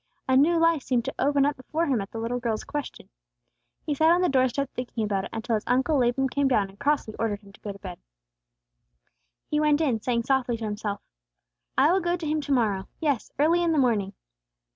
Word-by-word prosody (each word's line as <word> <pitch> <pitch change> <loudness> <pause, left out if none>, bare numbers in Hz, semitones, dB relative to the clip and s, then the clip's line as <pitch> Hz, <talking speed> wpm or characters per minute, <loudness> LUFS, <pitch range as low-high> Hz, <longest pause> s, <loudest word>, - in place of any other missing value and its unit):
A 260 - +3
new 315 +6 +4
life 330 -2 +3
seemed 245 -2 0
to 270 - -3
open 285 -1 +3
up 290 0 +1
before 310 +6 -2
him 260 -8 +1
at 195 - -7
the - - -8
little 230 +2 -2
girl's 230 -3 -2
question. 290 -1 -6 0.8
He 300 - 0
sat 315 +3 +3
on 350 +2 +4
the 360 - +2
doorstep 260 +1 +1
thinking 245 -2 -4
about 200 -2 -1
it - - -8
until 225 +1 -3
his 215 -1 0
Uncle 265 +4 +2
Laban 250 +2 +2
came 280 +2 0
down 210 -7 +2
and 195 - -18
crossly 285 -7 0
ordered 215 -2 -1
him 200 -1 -17
to - - -18
go 205 - -5
to 200 - -10
bed. 185 -3 -9 1.5
He 300 - -1
went 300 -1 +3
in, 260 -9 +1
saying 235 -1 0
softly 255 -2 +1
to 225 - -5
himself, 210 -1 -4 0.8
"I 330 - +5
will 380 - +3
go 345 0 0
to 340 -2 -6
him 305 0 0
to 285 - -5
morrow; 210 -7 +1
yes, 285 -7 -1
early 325 +5 +3
in 335 -1 +2
the - - +1
morning!" 220 -7 +1
260 Hz, 225 wpm, -26 LUFS, 220-295 Hz, 1.5 s, I